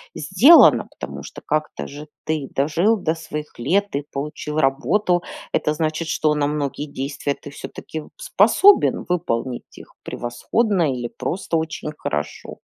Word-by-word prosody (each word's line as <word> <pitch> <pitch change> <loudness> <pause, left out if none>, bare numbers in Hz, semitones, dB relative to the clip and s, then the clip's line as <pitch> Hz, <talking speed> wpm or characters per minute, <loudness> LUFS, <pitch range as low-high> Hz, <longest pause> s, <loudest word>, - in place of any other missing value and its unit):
сделано, 325 +5 +6
потому - - -7
что - - -10
как-то 155 0 -2
же 145 +2 -9 0.2
ты 155 -3 -2
дожил 165 +10 +2
до 165 -6 -1
своих 150 -3 -7
лет 200 +11 +1
и 145 - -5
получил 150 +1 -4
работу. 175 +6 +2 0.3
Это 150 - +1
значит, 155 +1 -2
что 155 -1 +1
на 145 -1 +1
многие 145 -1 -2
действия 140 0 -3
ты 145 - -11
всё-таки 155 +2 -7
вот 150 - -12
способен 410 -4 +4
выполнить 130 -8 -2
их - - -14
превосходно 185 - 0
или 120 -2 -4
просто 175 +3 -2
очень 160 -1 -4
хорошо. 75 0 -4
155 Hz, 140 wpm, -21 LUFS, 140-175 Hz, 0.3 s, сделано